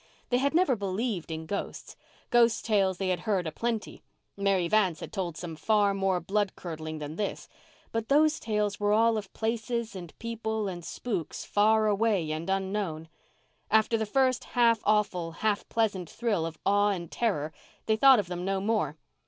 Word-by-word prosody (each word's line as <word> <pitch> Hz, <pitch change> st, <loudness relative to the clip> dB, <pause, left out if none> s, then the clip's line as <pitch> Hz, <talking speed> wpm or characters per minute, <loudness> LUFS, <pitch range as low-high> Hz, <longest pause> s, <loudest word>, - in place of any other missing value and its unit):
They 245 Hz, -, +2 dB
had 280 Hz, +3 st, +1 dB
never 340 Hz, -7 st, +4 dB
believed 200 Hz, -2 st, -2 dB
in 160 Hz, 0 st, -5 dB
ghosts. 200 Hz, +5 st, -5 dB, 0.4 s
Ghost 235 Hz, -1 st, +4 dB
tales 195 Hz, -4 st, +2 dB
they 190 Hz, 0 st, -1 dB
had 180 Hz, -2 st, 0 dB
heard 190 Hz, -2 st, 0 dB
a 160 Hz, -, -3 dB
plenty—Mary 200 Hz, -4 st, -2 dB
Vance 185 Hz, -4 st, +2 dB
had -, -, -8 dB
told 175 Hz, -5 st, -3 dB
some 170 Hz, -2 st, -6 dB
far 205 Hz, +4 st, +2 dB
more 195 Hz, -2 st, +1 dB
blood 200 Hz, +3 st, -1 dB
curdling 160 Hz, -2 st, -6 dB
than 150 Hz, +1 st, -6 dB
this; 210 Hz, -, -3 dB, 0.4 s
but 225 Hz, -1 st, -2 dB
those 305 Hz, +2 st, +4 dB
tales 210 Hz, -2 st, -1 dB
were 205 Hz, 0 st, +2 dB
all 225 Hz, +1 st, +4 dB
of 205 Hz, -3 st, -4 dB
places 230 Hz, 0 st, -2 dB
and 175 Hz, -4 st, -9 dB
people 220 Hz, -2 st, -3 dB
and 175 Hz, -2 st, -5 dB
spooks 190 Hz, -5 st, -4 dB
far 215 Hz, +1 st, +3 dB
away 205 Hz, -6 st, +1 dB
and 160 Hz, +3 st, -4 dB
unknown. 190 Hz, -5 st, -2 dB, 0.6 s
After 220 Hz, +2 st, +3 dB
the 220 Hz, -1 st, -1 dB
first 255 Hz, +2 st, +2 dB
half 230 Hz, -2 st, +5 dB
awful, 200 Hz, -6 st, +1 dB
half 210 Hz, +3 st, -1 dB
pleasant 200 Hz, -7 st, 0 dB
thrill 210 Hz, -9 st, -1 dB
of 160 Hz, -1 st, -8 dB
awe 205 Hz, +1 st, +4 dB
and 175 Hz, -5 st, -3 dB
terror 160 Hz, -10 st, -1 dB, 0.3 s
they 220 Hz, -, +2 dB
thought 265 Hz, +3 st, +7 dB
of 205 Hz, -, 0 dB
them 180 Hz, 0 st, -5 dB
no 195 Hz, +1 st, 0 dB
more. 190 Hz, -8 st, 0 dB
205 Hz, 175 wpm, -28 LUFS, 180-225 Hz, 0.6 s, thought